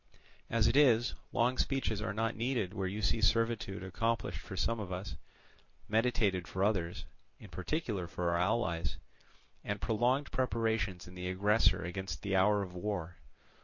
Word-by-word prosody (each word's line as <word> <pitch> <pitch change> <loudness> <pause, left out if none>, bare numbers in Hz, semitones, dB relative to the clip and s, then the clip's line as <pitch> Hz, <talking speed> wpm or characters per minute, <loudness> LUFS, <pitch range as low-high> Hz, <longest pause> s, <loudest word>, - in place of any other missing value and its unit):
As 115 -2 +3
it - - +2
is, 125 -5 +5 0.2
long 125 +1 +1
speeches 130 -6 0
are 105 0 -2
not 115 +2 -1
needed 115 -5 -1
where 95 -3 -2
you 105 +3 -4
see 110 - +2
servitude 110 -3 +1
accomplished 115 +5 -1
for - - -8
some 115 0 0
of 100 -3 -5
us, 90 -1 -4 0.7
meditated 110 -5 +1
for 95 - -2
others—in 100 +1 -3
particular 100 - -2
for 85 0 -1
our 85 - +1
allies—and 90 +1 -3
prolonged 125 +6 +1
preparations 110 -7 0
in 90 - -11
the 90 0 -4
aggressor 100 0 +3
against 95 +2 -5
the 100 -1 0
hour 100 +2 +4
of 90 -2 -8
war. 90 -2 -4
105 Hz, 150 wpm, -33 LUFS, 95-115 Hz, 0.7 s, is